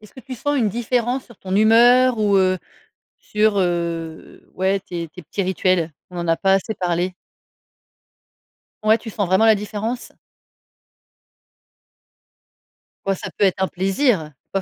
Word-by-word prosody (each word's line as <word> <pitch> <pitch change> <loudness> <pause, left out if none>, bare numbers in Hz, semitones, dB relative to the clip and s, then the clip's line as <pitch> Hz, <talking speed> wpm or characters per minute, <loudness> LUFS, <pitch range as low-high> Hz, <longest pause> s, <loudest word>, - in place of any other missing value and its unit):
Est 215 - -14
ce - - -22
que 260 - -10
tu 260 +1 -8
sens 290 +4 -1
une 225 -4 +2
différence 240 +3 -1
sur 235 -5 -17
ton 190 0 -4
humeur, 240 +3 +5
ou, 205 -2 +3
heu, 185 -1 +2 0.6
sur, 210 -1 +1
heu, 170 -3 -3
ouais, 190 +1 0
tes 170 -3 -6
tes 180 +2 -13
petits 200 - -4
rituels? 185 -3 0 0.2
On - - -10
n'en 170 - -3
a 165 0 +2
pas 195 0 +3
assez 205 +3 0
parlé. 180 0 -1 1.7
Ouais, 220 +1 +5
tu 225 0 -9
sens 205 -2 -2
vraiment 190 +5 +3
la 220 -1 +6
différence? 215 +4 -4 2.9
Ouais, 195 - +2
ça - - -7
peut 205 - +3
être 190 0 0
un 190 - +2
plaisir, 190 - 0 0.2
pas 195 - -1
195 Hz, 155 wpm, -21 LUFS, 185-225 Hz, 2.9 s, la